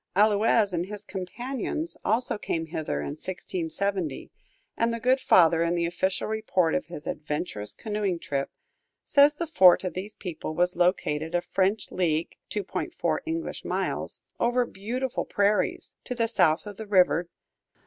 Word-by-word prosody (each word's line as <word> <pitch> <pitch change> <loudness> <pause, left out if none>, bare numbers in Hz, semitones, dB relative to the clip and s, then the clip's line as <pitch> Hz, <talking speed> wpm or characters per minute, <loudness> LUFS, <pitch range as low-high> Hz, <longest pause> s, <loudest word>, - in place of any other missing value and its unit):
Allouez 210 0 +4
and 175 +1 -1
his 210 0 -7
companions 245 - -4
also 225 0 +1
came 165 -4 -2
hither 160 -1 -3
in - - -4
1670, 180 0 -3 0.4
and 230 0 +1
the 230 - -3
good 255 +3 +3
father, 165 -9 +5
in 170 +1 +1
the 170 -1 +1
official 185 +3 -1
report 215 -6 +1
of - - -1
his 170 -3 -8
adventurous 150 -8 -4
canoeing 210 -4 -2
trip, 140 -4 -3 0.5
says 290 +1 +5
the 340 - -2
fort 190 - +6
of 185 - -3
these 195 +3 -6
people 155 -4 -5
was 180 +1 +2
located 170 -2 +1
a 175 - +2
French 195 +4 0
league 165 -3 0
(2.4 205 -3 -2
English 330 0 -3
miles) - - -2 0.2
"over 245 +1 +2
beautiful 240 +5 -3
prairies" 205 +1 0
to 250 - -4
the 230 -1 +1
south 175 -7 +3
of 205 -2 -8
the 220 - -7
river. 180 -3 +3
190 Hz, 150 wpm, -27 LUFS, 170-220 Hz, 0.5 s, fort